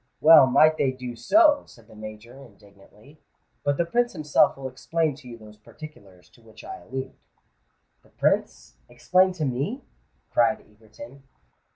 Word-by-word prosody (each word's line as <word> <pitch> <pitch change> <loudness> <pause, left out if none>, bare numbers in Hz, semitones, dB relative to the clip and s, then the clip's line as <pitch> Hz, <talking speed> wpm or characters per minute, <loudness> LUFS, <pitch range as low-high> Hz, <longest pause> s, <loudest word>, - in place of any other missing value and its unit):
"Well 155 -3 +7
might 155 +4 +4
they 135 - +1
do 125 -2 -8
so!" 295 - +3
said 115 -2 -19
the 110 - -18
Major, 110 +4 -11
indignantly. 105 +5 -21 0.4
"But 145 -1 -1
the 170 - 0
Prince 240 +8 -1
himself 150 -5 +1
will 135 -1 -6
explain 155 +4 -2
to 140 -4 -16
you 120 -1 -10
those 105 -1 -16
particulars 105 - -15
to 120 - -23
which 110 -1 -17
I - - -9
allude." 130 +2 -7 0.9
"The - - -26
Prince—explain 185 - -1
to 165 -4 -4
me!" 140 - -4 0.5
cried 120 +2 +2
Egerton. 110 +5 -16
130 Hz, 150 wpm, -24 LUFS, 110-155 Hz, 0.9 s, Well